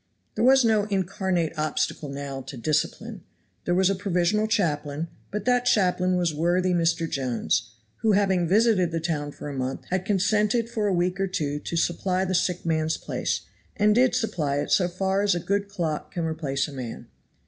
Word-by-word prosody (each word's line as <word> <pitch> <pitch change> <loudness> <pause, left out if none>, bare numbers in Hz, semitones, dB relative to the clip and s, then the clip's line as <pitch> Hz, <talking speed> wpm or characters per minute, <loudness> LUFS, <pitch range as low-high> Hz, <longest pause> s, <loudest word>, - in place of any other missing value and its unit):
There 220 - -1
was 265 0 +6
no 215 -2 +3
incarnate 190 -4 -1
obstacle 155 -1 -1
now 140 -1 -5
to 135 - -7
"discipline." 165 - -2 0.4
There 175 - +1
was 190 0 +4
a 195 - +2
provisional 195 +2 +1
chaplain, 160 -7 -1 0.2
but 210 - -4
that 245 0 +2
chaplain 185 -5 +2
was 175 -3 +1
worthy 175 +4 +1
Mr. 165 -1 +1
Jones, 120 -5 -1 0.2
who 220 -2 +2
having 190 -3 +2
visited 205 -2 +3
the 165 - -1
town 155 -3 -2
for 150 - -9
a 145 - -5
month, 130 0 -4
had 185 0 0
consented 210 +4 +1
for 215 -3 0
a - - +1
week 180 +1 0
or 195 - +1
two 145 -5 -2
to 170 - -4
supply 185 +3 0
the 185 - -2
sick 180 -1 0
man's 160 -1 0
place, - - -2 0.4
and 210 +1 +4
did 250 +3 +3
supply 155 -10 -1
it 145 - -2
so 180 - +4
far 190 +2 0
as 205 -2 +2
a - - -1
good 200 +3 -1
clock 165 -6 -3
can 170 -2 -2
replace 155 -4 -1
a 145 - -10
man. 125 -4 -6
180 Hz, 190 wpm, -25 LUFS, 155-200 Hz, 0.4 s, was